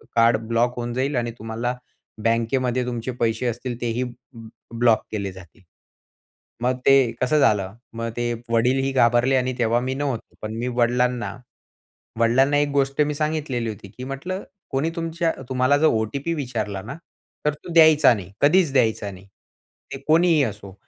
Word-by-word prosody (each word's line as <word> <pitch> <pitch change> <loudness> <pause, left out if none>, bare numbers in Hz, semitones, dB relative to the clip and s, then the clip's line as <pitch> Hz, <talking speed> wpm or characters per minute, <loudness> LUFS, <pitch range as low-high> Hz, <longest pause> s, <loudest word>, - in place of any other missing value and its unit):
Card 115 -1 +5
block 115 +2 +1
होऊन 120 0 -4
जाईल 135 +3 -1
आणि 120 -1 -1
तुम्हाला 115 +3 -3 0.5
बँकेमध्ये 120 +2 +1
तुमचे 120 0 -3
पैसे 115 +2 0
असतील 120 +1 -4
तेही 120 +1 -1 0.7
ब्लॉक 115 -1 +3
केले 100 -3 -3
जातील." 95 0 -15 1.0
मग 125 +1 +1
ते 135 -3 +5
कसं 150 +4 +3
झालं. 100 -7 +2 0.2
मग 115 0 -3
ते 120 0 0 0.2
वडीलही 130 +4 +2
घाबरले 125 0 +3
आणि 130 0 +1
तेव्हा 115 0 +2
मी 130 +1 -2
नव्हतो. 135 -4 -4
पण 110 0 -5
मी 120 +2 -2
वडिलांना 125 0 0 0.8
वडिलांना 130 +5 +4
एक 145 0 +2
गोष्ट 140 +1 +2
सांगितलेली 150 -6 -2
होती 105 -1 -9
की 125 +6 -9
म्हटलं, 140 +9 -5 0.3
"कोणी 140 +5 0
तुमच्या 165 0 -1 0.2
तुम्हाला 130 +2 +2
जर 160 - +4
ओ-टी-पी 135 +6 0
विचारला 110 -9 -3
ना, 115 +7 -7 0.5
तर 150 - +2
तो 150 +3 -10
द्यायचा 160 -4 +7
नाही, 95 -3 -8
कधीच 160 +1 +4
द्यायचा 110 -6 +1
नाही, 95 0 -13 0.7
ते 135 - -5
कोणीही 165 -1 +4
असो." 100 -4 -7
125 Hz, 150 wpm, -23 LUFS, 115-140 Hz, 1.0 s, द्यायचा